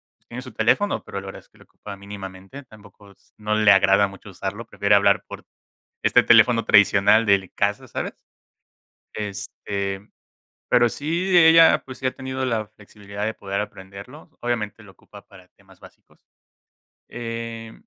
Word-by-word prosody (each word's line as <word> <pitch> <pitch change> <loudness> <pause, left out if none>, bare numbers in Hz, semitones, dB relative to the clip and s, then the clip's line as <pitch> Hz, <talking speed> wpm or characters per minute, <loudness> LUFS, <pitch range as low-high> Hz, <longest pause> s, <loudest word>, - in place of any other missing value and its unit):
pues - - -41
tiene 120 +1 -7
su 130 0 -12
teléfono 205 0 +1
pero 100 - -7
la 100 - -11
verdad 95 - -9
es - - -29
que - - -26
lo - - -19
ocupa 100 -1 -11
mínimamente, 100 +4 -10
tampoco 105 -3 -18
es - - -28
no 105 0 -3
le 110 -1 +3
agrada 100 +1 +4
mucho 100 +1 -13
usarlo, 100 +4 -6
prefiere 100 -1 +1
hablar 100 -1 +3
por - - -10 0.6
este - - +4
teléfono 115 -2 +5
tradicional 105 +2 +4
del 100 -3 +1
casa, 105 0 -1
¿sabes? - - -5 1.0
Este, 100 -1 -5 0.6
pero 120 - +4
sí 170 +8 -1
ella, 165 0 +6
pues, 130 -1 -10
sí 130 - -7
ha 130 - +1
tenido 130 0 -5
la 110 -4 -2
flexibilidad 100 -1 -9
de 110 - -2
poder 100 +1 -4
aprenderlo, 100 +8 -11
obviamente, 115 -3 -3
lo 95 - -15
ocupa - - -16
para - - -18
temas - - -23
básicos, - - -20 0.9
eh, 115 -1 -7
105 Hz, 160 wpm, -22 LUFS, 100-120 Hz, 1.0 s, ella